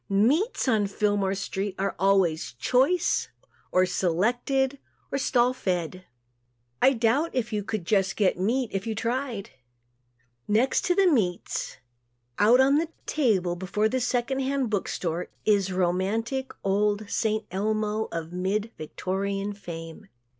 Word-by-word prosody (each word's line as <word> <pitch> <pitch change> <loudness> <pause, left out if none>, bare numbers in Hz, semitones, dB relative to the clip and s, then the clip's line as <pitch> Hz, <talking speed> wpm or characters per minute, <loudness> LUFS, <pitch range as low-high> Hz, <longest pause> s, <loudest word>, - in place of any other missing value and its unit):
Meats, 270 - +2
on 215 -5 +2
Fillmore 200 -1 0
street, 195 0 -3
are 195 +1 -1
always 190 -7 +2
"choice" 265 - +2 0.4
or 185 0 +4
"selected" 245 +10 0 0.3
or 275 - 0
"stall 250 -1 +2
fed." 185 -6 -3 0.8
I 270 - +6
doubt 245 +7 +2
if 240 -3 -2
you 210 -1 -1
could 215 -2 -3
get 195 0 +3
just 200 -5 +2
"meat" 235 +5 0
if 195 +2 -3
you 220 - -2
tried. 235 -2 -3 1.0
Next 225 +6 +2
to 355 - +2
the 390 - +4
meats, 210 - 0 0.6
out 230 +5 +6
on 275 +3 +5
a 335 - -3 0.2
table 195 - +1
before 190 +4 -1
a 255 +4 +1
second 250 +2 0
hand 265 -3 -1
book 200 -3 0
store 170 0 -3 0.2
is 200 -3 +3
romantic, 195 +9 -1
old 205 +1 +1
"St. 215 0 0
Elmo" 215 +2 -1
of 165 0 -5
mid 200 +5 -1
Victorian 195 +5 -3
fame. 170 0 -9
210 Hz, 135 wpm, -26 LUFS, 190-250 Hz, 1.0 s, I